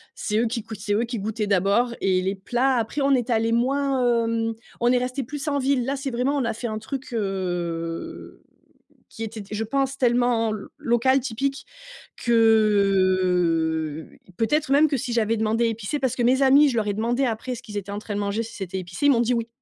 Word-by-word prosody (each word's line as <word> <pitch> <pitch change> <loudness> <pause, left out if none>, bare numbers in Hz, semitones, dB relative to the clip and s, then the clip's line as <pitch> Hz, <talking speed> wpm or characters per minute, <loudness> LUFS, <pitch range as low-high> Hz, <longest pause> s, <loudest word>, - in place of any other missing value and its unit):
c'est 210 0 -1
eux 235 - +2
qui 230 -1 -3
cou 225 0 -9
c'est 205 0 -3
eux 225 - +1
qui 240 -1 -4
goûtaient 215 +2 -2
d'abord. 200 +5 +2
Et 185 -1 +2
les 190 - 0
plats, 245 +6 0
après, 230 +5 -2
est 245 0 -1
allés 225 -1 +1
moins, 250 -1 +1
hem 225 0 -1 0.3
on 240 +1 +3
est 250 - +4
restés 255 +2 -2
plus 290 +4 -6
en 285 -1 +1
ville. 265 -2 +1
Là, 275 +2 -1
c'est 275 0 -4
vraiment 255 +3 0
on 260 - 0
a 230 - -1
fait 240 +2 -5
un 215 -1 -4
truc, 255 +3 -6
heu, 175 -5 -4 0.7
qui 225 - -9
était 225 0 -5
d 200 - -11
je 215 +1 -2
pense, 275 +3 -1
tellement 240 -2 +2
l 210 -2 -6
local, 260 0 +2
typique 270 +3 -3 0.5
que 185 -8 +2 0.3
peut-être 295 - 0
même 290 +3 +6
que 285 - 0
si 250 -1 -4
j'avais 230 -1 +1
demandé 220 +2 +1
épicé 225 +4 -2
parce 260 -3 0
que 245 - 0
mes 255 +3 +3
amis, 275 +2 +6
je 250 - -1
leur 220 -2 0
ai 205 - 0
demandé 240 +5 0
après 245 +1 -2
ce 245 - -9
qu'ils 210 -4 -9
étaient 200 -1 -4
en 205 - -3
train 210 -1 -6
de 205 - -2
manger, 205 +2 -1
si 230 0 -9
c'était 190 -2 -5
épicé, 180 +9 -3
ils - - +7
m'ont 235 - +2
dit 240 +1 +2
oui. 230 -1 -2
230 Hz, 220 wpm, -24 LUFS, 205-255 Hz, 0.7 s, ils